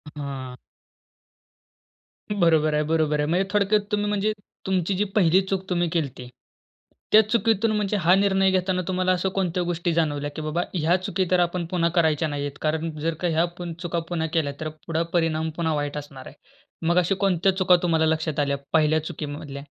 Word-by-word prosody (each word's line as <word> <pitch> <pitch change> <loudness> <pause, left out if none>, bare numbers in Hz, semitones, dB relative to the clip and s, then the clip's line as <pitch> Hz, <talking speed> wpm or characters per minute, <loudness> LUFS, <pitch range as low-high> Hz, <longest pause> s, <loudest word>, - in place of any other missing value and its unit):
हां. 135 -3 -6 1.8
बरोबर 160 -6 +3
आहे. 150 0 +2
बरोबर 155 -1 +1
आहे. - - +1
म्हणजे 185 +3 +1
थोडक्यात 210 +1 +3
तुम्ही 210 0 0
म्हणजे 210 +1 +1 0.3
तुमची 190 0 0
जी 205 - +2
पहिली 185 -1 +4
चूक 190 0 -3
तुम्ही 175 -1 +1
केली 160 -4 0
होती. 125 -1 -11 0.8
त्या 215 - +8
चुकीतून 225 -1 +2
म्हणजे 210 0 0
हा 175 +2 +4
निर्णय 195 -1 +3
घेताना 185 0 0
तुम्हाला 185 0 +1
अशा 185 +1 +1
कोणत्या 180 -2 -1
गोष्टी 170 -1 -1
जाणवल्या, 145 -3 0
की 155 - -4
बाबा 155 +3 -1
ह्या 170 +1 +2
चुकी 185 +1 -1
तर 180 - +4
आपण 175 0 0
पुन्हा 170 -2 +2
करायच्या 160 -2 +2
नाहीयेत, 145 -1 -3
कारण 160 +1 -1
जर 165 +2 -1
का 175 - +1
ह्या 165 +1 +2 0.4
चुका 170 -1 -2
पुन्हा 160 -2 -1
केल्या. 150 -4 0
तर 155 - -3 0.2
पुढे 165 0 0
परिणाम 160 -2 +1
पुन्हा 160 -2 0
वाईट 145 0 -3
असणार 140 -3 -9
आहे. 145 - -12 0.5
मग 175 - +2
अशा 180 +2 +3
कोणत्या 190 -1 +2
चुका 185 -1 +5
तुम्हाला 160 -2 +2
लक्षात 160 -1 0
आल्या 140 -1 +1 0.2
पहिल्या 155 0 +4
चुकीमधल्या? 145 -2 -6
170 Hz, 180 wpm, -24 LUFS, 155-185 Hz, 1.8 s, त्या